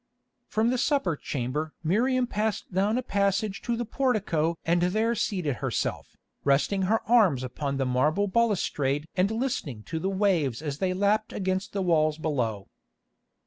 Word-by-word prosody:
From 225 +2 +1
the 255 - 0
supper 275 - +1
chamber 145 +3 -3
Miriam 245 +9 +2
passed 215 -4 -2
down 200 +5 +2
a 255 - -1
passage 200 -1 0
to 235 -1 -2
the 240 - -2
portico 200 - 0
and 170 +1 +2
there 215 +6 +1
seated 180 - -1
herself, - - -3 0.3
resting 145 +8 +2
her 225 +1 +1
arms 205 - +4
upon 140 +2 -3
the 135 - 0
marble 150 +10 +2
balustrade 165 -10 0
and 190 +1 +2
listening 220 - -3
to 160 +9 -4
the 190 - -1
waves 185 - +1
as 145 -1 -4
they 185 -1 0
lapped 205 +3 +1
against 190 0 -2
the 195 -1 -1
walls 155 -3 +2
below. 120 -11 -2
185 Hz, 155 wpm, -27 LUFS, 150-215 Hz, 0.3 s, arms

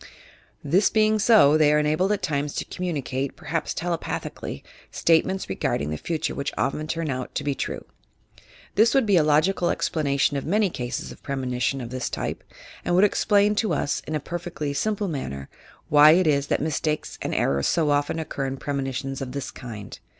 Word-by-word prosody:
This 180 +8 +3
being 215 0 +3
so, 200 -9 +6
they 150 -1 +4
are 150 - +4
enabled 155 +6 +1
at 205 -3 -1
times 145 -3 -1
to - - -2
commum 175 -6 -3
eate 135 +1 -2
(perhaps 165 +1 -3
telepathically) 170 - -4 0.3
statements 185 +4 +1
regarding 75 -6 -1
the - - -1
future 160 - -3
which 140 0 -3
often 155 +3 -1
turn 160 -2 -2
out 130 -1 -5
to - - -1
be 145 -1 0
true. - - -4 0.9
This 225 +4 +4
would 270 -3 +4
be 205 -2 +3
a 170 - +6
logical 155 +4 +2
explanation 140 -2 0
of 135 - -3
many 200 +2 +1
cases 125 -2 -4
of - - -13
premonition 130 -1 -2
of 120 -1 -7
this 130 -1 -3
type, - - -4 0.4
and 175 - +1
would 185 - +5
explain 205 0 +3
to 220 - +1
us, 145 - -1
in 155 - -2
a - - 0
perfectly 170 -2 -4
simple 210 +5 -1
manner, 70 - -5 0.4
why 150 +1 +7
it 185 +2 +3
is 140 -2 +2
that - - 0
mistakes 155 0 -2
and - - -2
errors 70 0 +1
so 155 -3 +2
often 145 +2 +1
occur 145 -4 -3
in 135 0 -4
premonitions 135 -1 -3
of 130 -2 -5
this 140 -2 -4
kind. 110 -5 -9
150 Hz, 185 wpm, -24 LUFS, 135-175 Hz, 0.9 s, why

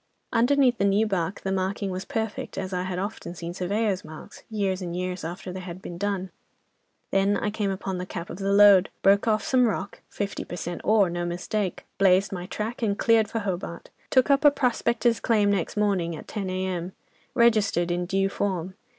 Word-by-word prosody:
Underneath 250 0 +3
the - - +2
new 200 +2 +3
bark 190 -2 -2
the 190 - -2
marking 190 +1 -1
was 185 +1 -4
perfect, 225 -6 -4
as 190 0 -3
I 180 - 0
had 185 0 -3
often 190 -2 -5
seen 170 +1 -6
surveyors' 195 +2 -1
marks, 155 0 -11
years 200 -3 -1
and 175 -1 -4
years 180 -1 -3
after 180 +3 -6
they 190 - -5
had 180 -1 -7
been 175 -2 -8
done. 195 -2 -2 0.8
Then 195 +1 +3
I 210 - -1
came 210 -2 -1
upon 190 -1 -3
the 180 - -5
cap 170 -2 -6
of 175 - -8
the 195 0 0
lode, 200 -2 +7
broke 200 +3 +4
off 215 -2 +2
some 250 -2 +3
rock, 200 -2 -4
fifty 200 -1 -4
per - - -7
cent. 175 0 -5
ore, 210 -4 +4
no 175 0 -2
mistake. 180 +3 -3
Blazed 195 0 +4
my 180 -2 -5
track 220 +5 -4
and 205 -3 0
cleared 225 -2 +4
for 225 - -2
Hobart. 180 -3 -5 0.2
Took 260 +2 +4
up 280 +2 +3
a 295 - +9
prospector's 240 -3 +1
claim 210 -3 +2
next 195 0 -1
morning 190 -5 +1
at - - -10
10 200 -4 -4
a.m. 185 -1 -3 0.4
Registered 215 -7 +3
in 175 0 -1
due 195 +1 +1
form. 190 -2 -2
195 Hz, 200 wpm, -26 LUFS, 180-215 Hz, 0.8 s, a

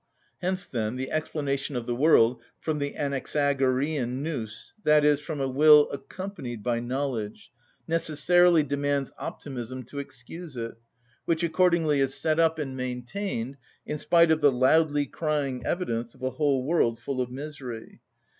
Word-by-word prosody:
Hence, 185 0 -1
then, 110 -1 -2
the 130 +1 -4
explanation 145 -3 -2
of 120 -2 -2
the 120 - -1
world 125 -3 +4 0.2
from 155 -2 -2
the 145 0 -3
Anaxagorean 140 -1 0
νους, 120 -10 -5
i.e., 150 -1 +5
from 150 +1 -6
a 135 - 0
will 150 +2 +6
accompanied 140 - -6
by 120 -1 0
knowledge, 120 -3 -3 0.4
necessarily 165 +1 +3
demands 140 -1 -1
optimism 130 -2 -6
to 140 +4 -8
excuse 140 +3 -9
it, 115 -1 -4 0.5
which 165 0 0
accordingly 165 -3 +3
is 135 0 +1
set 160 0 0
up 160 -1 +3
and 135 -4 -4
maintained 130 - -4 0.3
in 150 - -4
spite 170 +1 +4
of 160 0 +2
the 145 -1 +6
loudly 145 +3 +3
crying 140 -5 -2
evidence 120 -10 -2
of - - -15
a 130 - 0
whole 135 -1 +1
world 125 -7 +2
full 135 -2 -3
of 125 - -2
misery. 130 -4 -8
140 Hz, 145 wpm, -27 LUFS, 125-155 Hz, 0.5 s, will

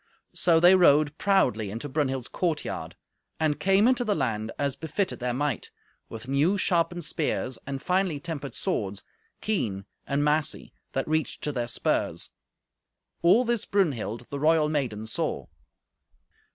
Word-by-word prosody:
So 165 -2 +4
they 175 +2 +7
rode 150 -5 +5
proudly 115 - +2
into 115 +8 -5
Brunhild's 135 -3 -1
courtyard, 170 -4 -3 0.4
and 155 -2 +1
came 195 +3 +4
into 250 -1 +3
the 210 -3 0
land 110 - -1
as 140 -2 -1
befitted 180 +5 -2
their 125 0 -1
might, 135 -1 -2 0.4
with 115 +1 -8
new 145 +9 +2
sharpened 175 -3 +1
spears, 135 -5 -2
and 135 -1 -3
finely 180 -4 +1
tempered 145 -3 -5
swords, 100 - -2 0.4
keen 105 - -1 0.2
and 140 +1 +1
massy, 150 0 0 0.2
that 135 - -1
reached 155 0 -1
to 150 - -1
their 120 -4 -2
spurs. 115 - -1 0.9
All 215 +9 +5
this 235 -2 0
Brunhild, 125 - 0
the 140 - -3
royal 155 0 +3
maiden, 125 -8 -2
saw. 110 - -2
150 Hz, 140 wpm, -27 LUFS, 125-175 Hz, 0.9 s, they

